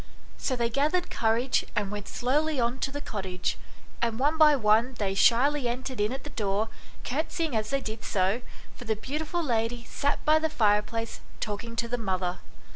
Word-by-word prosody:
So 260 - 0
they 235 -1 +1
gathered 310 +8 +1
courage 230 +3 +2
and 205 -1 0
went 205 -1 -5
slowly 295 +4 0
on 240 +2 0
to 270 - -1
the 285 +1 -5
cottage, 190 -7 -3 0.5
and 230 -2 0
one 290 +5 +2
by 305 -2 +7
one 230 +1 +3
they 195 -2 0
shyly 250 +7 +4
entered 250 -1 -3
in 210 +2 +1
at 265 +1 -5
the 295 - -8
door, 210 +1 0 0.3
curtseying 315 +1 -1
as 215 -1 0
they 275 0 0
did 220 -2 -6
so, 195 +5 +1 0.3
for 245 - -11
the 220 -1 +1
beautiful 305 +9 -3
lady 235 -3 0
sat 285 +1 -1
by 310 +1 +5
the 320 0 0
fireplace 225 -3 +1 0.2
talking 225 +2 -4
to 235 0 -1
the 245 +1 -2
mother. 185 -3 -1
235 Hz, 185 wpm, -28 LUFS, 215-280 Hz, 0.5 s, by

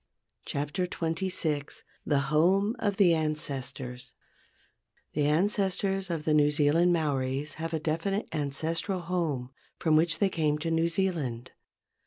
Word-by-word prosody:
26 150 +6 -2
o 160 0 +1
DESCRIPTION 160 -5 -2 0.3
THE 145 - +3 0.2
HOME 195 +8 +3
OF 205 -2 0
THE 180 -5 +5
ANCESTORS 135 -5 -3 1.0
The 145 -1 +1
ancestors 195 +3 +1
of 165 -3 -2
the 155 - +2
New 150 -1 +5
Zealand 150 +4 +3
Maoris 145 -3 -1
have 165 0 -3
a 160 - -1
definite 165 +7 -1
ancestral 160 +5 -1
home 165 -8 -2 0.3
from 160 -2 +2
which 160 +1 +3
they 200 - +2
came 155 -4 0
to 165 +2 -3
New 165 +1 +2
Zealand. 155 -10 -2
160 Hz, 135 wpm, -29 LUFS, 145-180 Hz, 1.0 s, THE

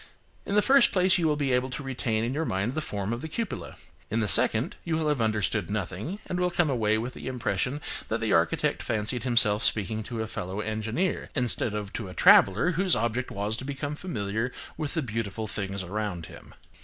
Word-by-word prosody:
In 200 - -1
the 210 - +5
first 275 -1 +6
place, 185 0 +4
you 165 - +2
will 150 - +2
be 140 -2 0
able 125 +1 +1
to 130 +3 -5
retain 120 -4 -1
in 120 +2 -1
your 155 +3 -1
mind 100 -2 -1
the 155 - -2
form 100 -5 -3
of 120 - -4
the 160 - -5
cupola; 210 +6 -4 0.3
in 110 - 0
the 110 - +1
second, 110 +3 +4
you 165 -2 -1
will 160 -1 0
have 145 -5 +1
understood 110 -3 0
nothing, 105 - -3
and 180 - -3
will 180 0 +2
come 175 -4 +1
away 110 -4 +2
with 120 +3 -4
the - - -8
impression 125 +1 -1 0.3
that 110 - -1
the 115 -2 0
architect 85 +1 +2
fancied 110 +4 -1
himself 110 -4 +3
speaking 110 +1 0
to 110 +1 -4
a - - -3
fellow 95 -2 -5
engineer, 110 - -2
instead 120 -4 +2
of 105 -1 -5
to 110 - -4
a 90 - -9
traveller 100 - +6
whose 185 +1 +2
object 120 +2 -1
was 105 +2 -2
to 130 - -6
become 140 +2 -4
familiar 115 - -3 0.2
with 150 +1 -3
the 160 - 0
beautiful 110 -2 -3
things 100 -2 -3
about 95 -3 -3
him. - - -13
115 Hz, 215 wpm, -27 LUFS, 105-145 Hz, 0.3 s, first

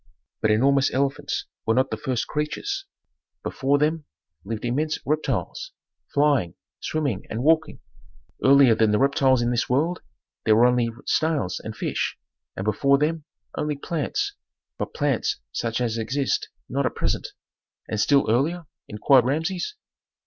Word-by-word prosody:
"But 110 - +2
enormous 135 +5 +3
elephants 135 +1 -1 0.2
were 110 - +1
not 130 +1 +2
the - - 0
first 130 -5 -2
creatures. 390 - -3 0.6
Before 140 +2 +1
them 155 +1 0 0.4
lived 110 +2 -4
immense 150 +6 0
reptiles: 310 - -2 0.4
flying, 140 - +2 0.2
swimming, 140 -11 -2
and 115 +3 -3
walking. 160 +1 +2 0.6
Earlier 135 -3 +7
than 110 -1 +3
the 105 - +3
reptiles 135 -1 +3
in 120 - +1
this 120 -1 0
world 160 +8 +1 0.4
there 110 - +4
were 115 +2 +6
only 125 -1 +3 0.2
snails 155 - 0
and - - -7
fish, - - -2 0.4
and 95 - -3
before 140 +7 +3
them 155 +1 -1 0.3
only 150 0 -1
plants, 405 - -2 0.5
but - - -4
plants 425 -1 0
such 115 0 -2
as 115 -2 -1
exist 130 +5 -1 0.2
not - - 0
at - - -5
present." - - -2 0.5
"And 110 - -3
still 140 +6 +3
earlier?" 155 +10 +1 0.2
inquired 120 +4 +4
Rameses. 170 - -1
140 Hz, 140 wpm, -24 LUFS, 120-155 Hz, 0.6 s, Earlier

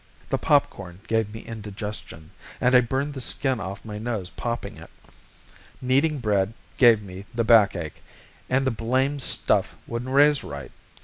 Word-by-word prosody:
The - - 0
popcorn 90 -1 0
gave 110 -2 0
me 110 - -8
indigestion, 105 -7 -7 0.3
and 125 - +2
I 125 - +8
burned 135 +4 -2
the 135 - -5
skin 130 0 0
off 100 +1 -6
my 105 -1 -6
nose 110 -5 -3
popping 120 0 -4
it. - - -12 0.9
Kneading 140 +4 +2
bread 105 -3 0 0.2
gave 115 -4 +6
me 95 +1 -10
the 115 - +1
backache, 100 -9 +3 0.5
and 135 +1 +2
the 130 - +2
blamed 130 +5 0
stuff - - +2
wouldn't 120 +2 -5
raise 145 +1 +5
right. 70 0 -8
115 Hz, 150 wpm, -25 LUFS, 100-130 Hz, 0.9 s, I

